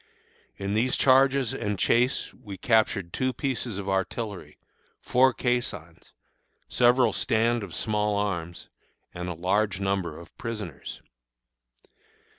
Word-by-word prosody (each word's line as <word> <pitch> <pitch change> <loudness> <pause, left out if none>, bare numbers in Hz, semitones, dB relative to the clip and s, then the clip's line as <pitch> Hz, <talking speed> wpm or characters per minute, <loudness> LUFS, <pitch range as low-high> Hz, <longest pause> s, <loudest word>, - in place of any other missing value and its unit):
In 100 0 -3
these 120 +4 +2
charges 135 -1 +4
and 105 -2 -2
chase 125 +7 +1
we 100 -3 -10
captured 105 -4 +1
two 130 0 0
pieces 125 -7 -3
of 100 -1 -5
artillery, 100 +1 -3 0.4
four 130 +1 +4
caissons, 120 -10 -3 0.6
several 120 -2 +4
stand 115 +1 +1
of 95 -5 -7
small 105 -1 0
arms, 85 -5 -3 0.5
and 90 +1 -5
a 90 - -4
large 100 +4 0
number 95 -5 -1
of 85 - -14
prisoners. 105 - -6
105 Hz, 115 wpm, -26 LUFS, 95-120 Hz, 0.6 s, charges